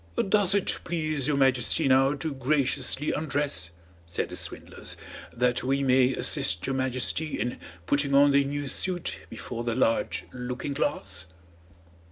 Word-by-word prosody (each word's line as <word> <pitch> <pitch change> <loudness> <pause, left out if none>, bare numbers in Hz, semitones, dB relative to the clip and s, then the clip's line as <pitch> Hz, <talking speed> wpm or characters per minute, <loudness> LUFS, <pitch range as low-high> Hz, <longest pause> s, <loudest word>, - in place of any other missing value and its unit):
"Does 200 -2 +4
it 200 - 0
please 155 -5 -1
your 145 -2 +1
Majesty 130 -2 +3
now 135 +2 +4
to 145 +2 -4
graciously 135 +1 0
undress," 145 - -1 0.4
said 85 - -2
the - - -6
swindlers, - - -4 0.3
"that 125 0 0
we 135 +2 +1
may 130 0 +4
assist 85 +2 +2
your 135 - -1
Majesty 130 +4 -1
in 120 - -2 0.3
putting 140 +4 +1
on 140 +1 +6
the 140 0 +4
new 145 +1 -3
suit 175 +5 -1
before 120 -1 -6
the 115 -1 -1
large 115 -3 +1
looking 125 +3 -4
glass?" 110 - -2
135 Hz, 145 wpm, -27 LUFS, 125-145 Hz, 0.4 s, on